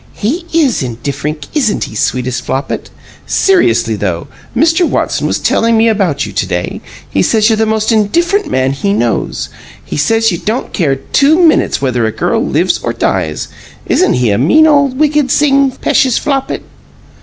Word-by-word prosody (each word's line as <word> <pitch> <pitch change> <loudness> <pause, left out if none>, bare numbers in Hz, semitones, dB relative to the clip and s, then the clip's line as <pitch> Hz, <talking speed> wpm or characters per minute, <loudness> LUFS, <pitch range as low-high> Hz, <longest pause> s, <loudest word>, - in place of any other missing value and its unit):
"He 320 - -3
IS 300 - +1
indifferink, 140 +5 -4
isn't 255 -9 0
he, - - -7
sweetest 125 +3 -2
Flopit? 135 +2 -3 0.4
Seriously, 115 - +2
though, 90 -5 -3 0.3
Mr. 325 +5 +3
Watson - - 0
was - - 0
telling 230 0 +1
me 225 +1 +3
about 190 - 0
you 105 - -8
to 95 - -1
day. 90 -1 -3 0.3
He 95 - -1
says 215 - +2
you're - - +3
the 220 0 0
most 220 +1 0
indifferent 340 - +1
man 130 0 +1
he 200 +9 -1
knows. 120 - -1 0.4
He - - -5
says 225 +9 +2
you 170 - -3
don't 225 +5 -3
care 150 -8 +1
two 285 - +2
minutes 315 - +2
whether 120 -4 0
a - - -2
girl - - -1
lives - - 0
or - - -3
dies. 80 -1 -2 0.4
Isn't - - +2
he 125 -3 +1
a 100 - +1
mean 300 - +4
ole 285 -2 +4
wicked 290 +1 0
sing, 275 -2 +3
p'eshus 255 -1 +1
Flopit!" 275 -2 -2
215 Hz, 170 wpm, -13 LUFS, -, 0.4 s, mean